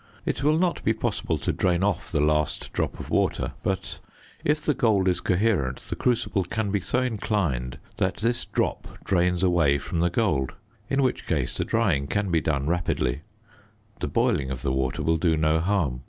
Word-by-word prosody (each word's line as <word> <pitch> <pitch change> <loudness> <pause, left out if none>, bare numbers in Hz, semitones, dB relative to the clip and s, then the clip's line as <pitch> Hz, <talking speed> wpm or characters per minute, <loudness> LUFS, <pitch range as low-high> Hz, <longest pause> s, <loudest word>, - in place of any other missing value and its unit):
It - - -1
will 155 +2 +4
not 175 0 0
be - - +3
possible - - -1
to - - -1
drain 90 0 +1
off 100 -1 -1
the 80 - +1
last 75 0 0
drop - - -2
of - - -8
water; - - +1
but 95 -1 -2 0.4
if 150 +1 +2
the 150 0 +1
gold 105 -7 +2
is 90 -2 +2
coherent, 90 - +1
the - - -6
crucible 105 -5 +1
can 105 +2 -2
be 100 -1 0
so 125 +8 0
inclined 95 - -1 0.2
that 95 +1 +1
this 120 +2 0
drop - - -2
drains 90 -1 +1
away 85 -6 +3
from 80 +4 -4
the 85 +1 +3
gold, 80 - 0 0.4
in 135 0 +2
which 130 - -1
case 75 -7 0
the - - -1
drying 90 -12 +1
can 100 +1 -1
be 80 -2 +3
done 70 -3 0
rapidly; 75 -5 0 0.8
the - - -2
boiling 70 -3 +1
of 65 -2 -5
the 65 - 0
water 65 -1 -1
will 80 0 +2
do 80 -1 +2
no 80 +1 +2
harm. 85 -8 0
90 Hz, 190 wpm, -25 LUFS, 75-105 Hz, 0.8 s, will